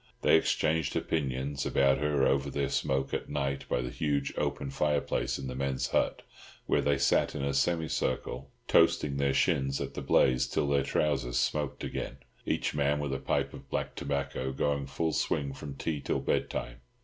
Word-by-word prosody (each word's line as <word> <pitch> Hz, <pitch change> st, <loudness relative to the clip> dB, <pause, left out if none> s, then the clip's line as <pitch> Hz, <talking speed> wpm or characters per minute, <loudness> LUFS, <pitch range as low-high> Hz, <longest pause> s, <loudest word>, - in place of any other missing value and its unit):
They -, -, +6 dB
exchanged 80 Hz, -2 st, +1 dB
opinions 70 Hz, -2 st, -1 dB
about 70 Hz, 0 st, +3 dB
her 75 Hz, -2 st, +2 dB
over 70 Hz, +1 st, +2 dB
their 70 Hz, 0 st, -1 dB
smoke 65 Hz, 0 st, 0 dB
at -, -, -2 dB
night 70 Hz, 0 st, -2 dB
by 60 Hz, -, +1 dB
the 60 Hz, -, -4 dB
huge 70 Hz, -3 st, -1 dB
open 70 Hz, -, -2 dB
fireplace 75 Hz, 0 st, 0 dB
in 70 Hz, -, -6 dB
the 65 Hz, -, -4 dB
men's 65 Hz, 0 st, -1 dB
hut, -, -, +1 dB, 0.4 s
where -, -, +2 dB
they 70 Hz, -1 st, +2 dB
sat 70 Hz, -, +2 dB
in 70 Hz, -, -3 dB
a 70 Hz, 0 st, 0 dB
semicircle, 80 Hz, -2 st, -1 dB, 0.2 s
toasting 70 Hz, -2 st, +4 dB
their 70 Hz, -1 st, +1 dB
shins 70 Hz, 0 st, +2 dB
at -, -, -4 dB
the -, -, -5 dB
blaze 65 Hz, 0 st, +3 dB
till 70 Hz, -, 0 dB
their 70 Hz, -1 st, +3 dB
trousers 70 Hz, -4 st, 0 dB
smoked 75 Hz, -2 st, -1 dB
again, 60 Hz, -, -4 dB, 0.3 s
each -, -, 0 dB
man 75 Hz, 0 st, +1 dB
with 70 Hz, -2 st, -2 dB
a 65 Hz, -, -2 dB
pipe -, -, -1 dB
of -, -, -11 dB
black -, -, -2 dB
tobacco 70 Hz, -2 st, -2 dB
going 70 Hz, +1 st, -1 dB
full 80 Hz, +4 st, -1 dB
swing 70 Hz, -2 st, 0 dB
from 70 Hz, 0 st, -7 dB
tea 75 Hz, 0 st, -3 dB
till -, -, -1 dB
bedtime. -, -, -2 dB
70 Hz, 180 wpm, -30 LUFS, 65-75 Hz, 0.4 s, They